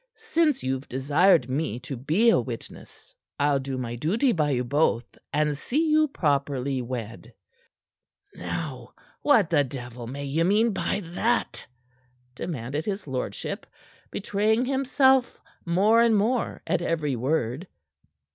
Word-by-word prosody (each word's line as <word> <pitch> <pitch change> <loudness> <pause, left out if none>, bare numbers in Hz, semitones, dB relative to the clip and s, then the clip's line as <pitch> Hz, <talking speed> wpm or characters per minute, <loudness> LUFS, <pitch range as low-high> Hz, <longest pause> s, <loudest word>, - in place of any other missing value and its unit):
Since 335 - +1
you've 130 +1 -3
desired 145 +3 +3
me 130 -3 -2
to 135 - -6
be 160 - +3
a - - +4
witness, 120 -2 -8 0.3
I'll 145 -1 +3
do 135 -1 -4
my 120 -2 -4
duty 205 - +1
by 155 -7 +1
you 125 -3 0
both 125 -2 +1 0.3
and 150 0 +1
see 305 - 0
you 310 0 +4
properly 140 - -1
wed." 115 -2 -6 1.0
"Now, - - -6 0.3
what 225 - +4
the 145 -3 +4
devil 125 -3 -7
may 140 +3 -5
you 150 +4 0
mean 215 +6 +3
by 200 - -1
that?" 235 +6 0 0.7
demanded 140 +1 -4
his 205 0 -3
lordship, 130 -3 -4 0.4
betraying 215 +4 0
himself 265 -1 +2 0.3
more 205 +7 +4
and 230 -2 +4
more 230 +4 0
at 180 - 0
every 155 -5 -1
word. 130 +4 -1
150 Hz, 130 wpm, -26 LUFS, 130-220 Hz, 1.0 s, a